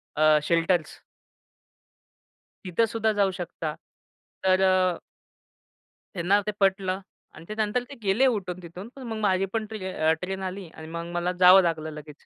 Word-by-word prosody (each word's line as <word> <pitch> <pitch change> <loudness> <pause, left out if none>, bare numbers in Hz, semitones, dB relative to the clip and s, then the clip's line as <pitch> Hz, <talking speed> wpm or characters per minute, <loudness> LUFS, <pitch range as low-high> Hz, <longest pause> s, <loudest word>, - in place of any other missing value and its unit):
अ, 155 0 +5
shelters 165 0 +1 1.7
तिथंसुद्धा 220 +4 +1
जाऊ 200 -2 +2
शकता. 160 -3 -4 0.7
तर 190 0 +3
अ 185 -2 +3 1.2
त्यांना 190 +3 +2
ते - - +1
पटलं 190 -1 +1 0.4
आणि 160 - -12
त्यानंतर 215 +3 -1
ते 280 - -9
गेले 200 +7 +3
उठून 185 -6 -2
तिथून, 180 +5 -9
पण 270 - -9
मग 220 -1 -4
माझी 195 -2 +2
पण 220 -1 -1
ट्र 185 -7 -1
ट्रेन 190 +1 -4
आली 185 -1 -5
आणि 160 0 -10
मग 170 +1 -5
मला 175 +1 0
जावं 185 +1 +9
लागलं 160 -2 -1
लगेच. 150 0 -12
185 Hz, 140 wpm, -26 LUFS, 170-200 Hz, 1.7 s, जावं